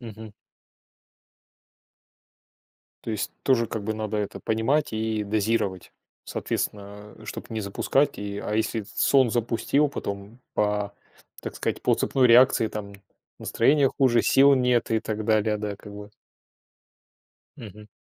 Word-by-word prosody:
Мгм. 110 -2 -10 2.7
То 115 - -4
есть 105 - -3
тоже 115 -4 +2
как 110 -3 -5
бы 110 +1 -2
надо 110 0 -3
это 105 -1 -3
понимать 115 +5 0
и 110 -1 -1
дозировать. 105 -2 -1 0.3
Соответственно, 105 +1 -5
а 110 - -13
чтобы - - -7
не 110 -1 -3
запускать. 135 +8 0
И, 100 0 -5
а 105 - -4
если 110 0 0
этот 100 - -15
сон 130 -4 +4
запустил, 120 +5 +1
потом 100 -1 -6
по 105 -1 0 0.5
так - - -6
сказать, - - -3
по - - +3
цепной 130 -2 +2
реакции 120 -1 +6
там 100 -2 -7 0.5
настроение 140 -1 +3
хуже, 125 -4 +3
сил 140 +1 +6
нет 125 -2 +1
и 110 - +2
так 110 -1 -4
далее, 110 -1 +2
да, 105 -1 -4
как 105 +1 -12
бы, - - -9
вот. 105 - -15 1.5
Мгм. 105 -1 -11
110 Hz, 140 wpm, -25 LUFS, 105-120 Hz, 2.7 s, реакции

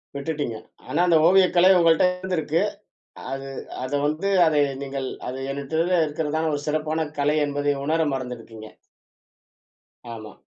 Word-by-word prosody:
விட்டுட்டீங்க. 145 -5 -3 0.3
ஆனா, - - -2
அந்த 170 -2 +5
ஓவியக்கலை 185 -1 +5
உங்கள்ட்ட 165 +1 +4
இருந்துருக்கு. 180 -4 -1 0.7
அது 135 0 -5 0.4
அத 130 - -5 0.2
வந்து 155 +7 -1 0.2
அதை 150 -2 +3 0.2
நீங்கள் 135 -1 -4 0.2
அது 130 +1 -5
என்கிட்ட 160 +6 0
இருக்கிறதான 155 +1 -2
ஒரு 145 - -2
சிறப்பான 155 +1 -1
கலை 145 +1 +2
என்பதை 145 0 0
உணர 160 +2 +1
மறந்திருக்கீங்க. 115 -4 -7 1.5
ஆமா. 110 -2 -10
150 Hz, 120 wpm, -24 LUFS, 135-165 Hz, 1.5 s, அந்த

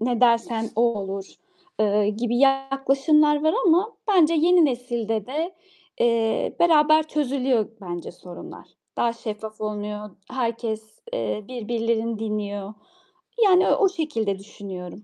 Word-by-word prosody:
ne 240 +1 0
dersen 230 -2 +2
o 230 - +3 0.2
olur." 195 0 -5 0.6
eee, 210 -1 +2
gibi 235 +3 -2
yaklaşımlar 275 +3 +3
var 315 - +3
ama 365 +7 +3 0.2
bence 335 -5 +4
yeni 340 +1 +5
nesilde 235 -5 -2
de, 320 +7 -3 0.5
eee, 230 -2 +1
beraber 310 -2 +5
çözülüyor 265 -6 0
bence 175 -2 -6
sorunlar. 180 0 -11 0.3
Daha 235 -1 +1
şeffaf 215 -1 -7
olunuyor. 210 0 -4 0.2
Herkes, 230 -3 -2 0.3
eee, 215 - -3
birbirlerini 230 -2 -2
dinliyor. 205 -2 -4 0.7
Yani 370 -1 +5
o - - +3
o - - +4
şekilde 230 - -2
düşünüyorum. 195 -2 -9
235 Hz, 120 wpm, -24 LUFS, 210-295 Hz, 0.7 s, yeni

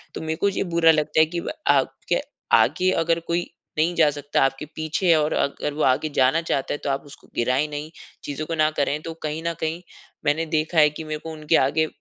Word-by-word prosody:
तो - - -5
मेरे 160 0 -2
को 200 - +4
ये 195 - -1
बुरा 165 -1 +6
लगता 155 0 +1
है 155 - +7
कि 170 +2 -4
व - - -5 0.2
आपके - - +1 0.4
आगे 185 +1 +3
अगर 165 -1 +1
कोई 170 +1 -2 0.3
नहीं 165 +3 +2
जा 155 -3 +5
सकता, 145 0 -1
आपके 135 +2 -1
पीछे 155 +4 -3
है 165 - +6
और 150 +1 0
अगर 140 +1 -1
वो 150 - -4
आगे 130 +4 +2
जाना 135 +5 +3
चाहता 140 -5 -1
है - - -2
तो - - -1
आप 135 0 -1
उसको 140 - -15
गिराए 125 +4 +1
नहीं 150 +1 -6 0.3
चीज़ों 145 +2 -4
को 165 - -2
ना 155 -1 +3
करें। 145 0 -1
तो 165 +1 -6
कहीं 155 +1 -3
न 170 - 0
कहीं 160 +2 -2 0.4
मैंने 155 +3 +1
देखा 155 +1 -1
है 150 -1 +7
कि 150 +2 -8
मेरे 155 -1 -4
को 160 +1 -8
उनके 155 +1 0
आगे 155 +4 +2
155 Hz, 235 wpm, -23 LUFS, 145-165 Hz, 0.4 s, है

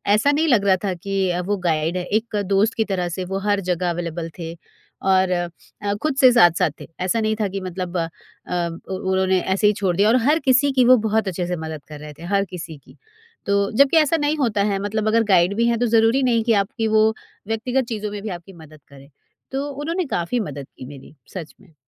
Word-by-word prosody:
ऐसा 280 +7 +3
नहीं 315 +3 +1
लग 220 -8 +3
रहा 190 -1 +5
था 190 - 0
कि 190 +1 -2
अ, 175 0 -1
वो 205 +3 -1
गाइड 160 +2 0
है 180 - -2
एक 215 +2 -2
दोस्त 200 +4 +2
की 220 - +1
तरह 180 -2 -1
से 180 - -3
वो 195 +1 -3
हर 205 -1 +2
जगह 175 0 -1
अवेलेबल 170 -1 -4
थे 165 0 -5 0.5
और 190 -1 +2
अ, 175 +3 -4
खुद 310 -3 0
से 255 -2 +7
साथ-साथ 175 - +4
थे। - - -9
ऐसा 185 +5 0
नहीं 215 0 0
था 205 - +1
कि 195 0 -5
मतलब 180 -1 -4
अ, 165 -1 0 0.8
उ 190 0 -3
उन्होंने 190 0 +2
ऐसे 195 +2 +1
ही 210 - +4
छोड़ 190 -4 -1
दिया 205 +2 +4
और 240 - +4
हर 315 +2 +4
किसी 275 +2 +4
की 255 -2 +4
वो 255 0 +7
बहुत 220 -1 +1
अच्छे 180 -1 -2
से 180 - -2
मदद 155 -2 -7
कर 150 -1 -9
रहे 150 0 -9
थे - - -10
हर 195 0 +2
किसी 165 -4 -8
की। - - -20 0.5
तो 200 - +1 0.2
जबकि 280 +4 +5
ऐसा 315 +1 +3
नहीं 295 +1 0
होता 225 -7 0
है 195 - -1
मतलब 215 +1 -2
अगर 225 +1 +3
गाइड 190 -1 +3
भी 235 - +2
हैं 235 -1 +2
तो 245 - +2
ज़रूरी 225 +4 +3
नहीं 230 -3 +2
कि 230 -1 +2
आपकी 220 +3 -3
वो 215 - +6 0.4
व्यक्तिगत 245 +3 -1
चीज़ों 210 -2 -4
में 205 -1 -6
भी 215 - -5
आपकी 180 +1 -8
मदद 155 -2 -15
करें। 140 0 -15 0.4
तो 275 +2 -2
उन्होंने 325 +6 -3
काफ़ी 175 +8 -1
मदद 140 -7 -6
की 130 - -9
मेरी। 140 +2 -12 0.2
सच 170 -5 -7
में। 180 -6 -21
195 Hz, 235 wpm, -21 LUFS, 175-230 Hz, 0.8 s, से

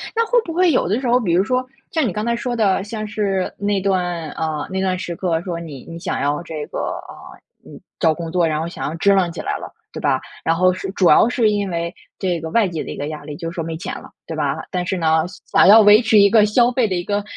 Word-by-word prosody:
那 460 0 +2
会 485 +2 +3
不 330 - -6
会 360 0 +3
有 255 - +1
的 210 +6 0
时 265 - -3
候 245 +1 +4
比 190 -9 -1
如 180 +2 +4
说 255 +4 0 0.3
像 320 -4 +1
你 215 - 0
刚 210 +4 -3
才 235 0 +1
说 245 0 -3
的 200 -4 +2
像 215 +1 -5
是 200 -3 -1
那 205 0 0
段， 180 -4 -1
呃， 155 -2 -3
那 190 0 -2
段 185 -1 0
时 175 - -5
刻 165 -2 -1
说 175 -2 -4
你 150 -6 -9
你 165 - -8
想 185 - -3
要 145 +3 0
这 155 -3 -6
个， - - -7 0.3
啊， - - -13 0.3
嗯， - - -12 0.2
找 160 - +3
工 165 0 -6
作， 175 -1 +2
然 155 -1 -1
后 160 - -3
想 170 - -6
要 155 - -5
支 200 +4 +3
棱 185 -3 +2
起 - - -9
来 - - -2
了， - - -9 0.2
对 - - -6
吧？ - - +1 0.2
然 165 - +2
后 185 +1 +3
是 185 - -5
主 190 -2 +2
要 180 +9 +6
是 235 -3 +2
因 205 -2 -1
为 170 0 -3 0.3
这 180 -3 -1
个 160 - -5
外 220 +2 +2
界 165 -3 -4
的 - - -7
一 - - -7
个 145 - -4
压 155 -1 -7
力， 145 0 -8
就 165 - -5
是 170 - -10
说 165 - -3
没 165 0 -5
钱 170 - -5
了， - - -13 0.2
对 - - -6
吧？ - - -1
但 180 -1 -2
是 190 - -2
呢， 160 -1 +2
想 180 - -1
想 - - +7
要 215 +3 +9
维 210 +1 +7
持 225 -2 +3
一 200 0 +6
个 215 0 +5
消 235 +3 +3
费 245 -3 +1
的 185 - -1
一 175 - -2
个， 205 0 -1
185 Hz, 310 characters per minute, -20 LUFS, 165-215 Hz, 0.3 s, 要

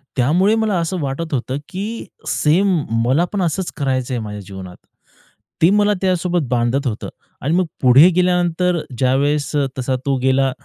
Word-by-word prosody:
त्यामुळे 175 - +3
मला 210 -4 0
असं 170 +2 -2
वाटत 145 +3 -4
होतं, 130 0 -2
की 210 +5 -5 0.2
सेम 185 +6 +2 0.3
मला 140 +8 +2
पण 200 - 0
असच 175 +1 -1
करायचं 130 -3 -1
आहे 120 - -1
माझ्या 105 -1 -7
जीवनात. 95 -2 -9 0.8
ते 165 - +6
मला 205 +1 +3
त्यासोबत 180 -4 0
बांधत 125 +3 0
होतं. 110 -3 -4 0.3
आणि 150 +4 -1
मग 185 0 +2 0.2
पुढे 135 +7 +7
गेल्यानंतर 180 -1 +1 0.2
ज्यावेळेस 140 +4 +1 0.3
तसा 130 0 -1
तो 140 -1 +1
गेला, 135 0 +2
150 Hz, 150 wpm, -19 LUFS, 130-180 Hz, 0.8 s, पुढे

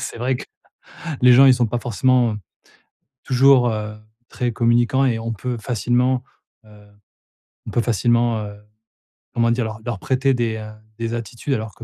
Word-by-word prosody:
C'est - - -6
vrai 125 +1 0
que - - -8 0.8
les 125 -1 +7
gens, 135 +2 +7
ils 130 - +7
sont 120 -2 +1
pas 120 +2 -2
forcément, 120 0 +1
heu, - - -5 0.9
toujours, 130 -1 +4
heu, 105 -1 -4 0.3
très 125 -1 -2
communicants 120 +3 +2
et 115 -3 0
on 115 0 -4
peut 120 +3 -4
facilement, 125 +3 0 0.4
heu, 105 -1 -18 0.8
on - - -5
peut 120 - +1
facilement, 120 0 +1
heu, 105 0 -9 0.8
comment 115 0 +2
dire? 120 0 0
Leur 110 0 -6
leur 115 -5 -4
prêter 135 +3 +1
des, 115 -2 -1
heu, 110 0 -8 0.3
des 115 0 -3
attitudes 120 +4 -4
alors 110 -3 -4
que 115 - -12
120 Hz, 170 wpm, -21 LUFS, 110-125 Hz, 0.9 s, les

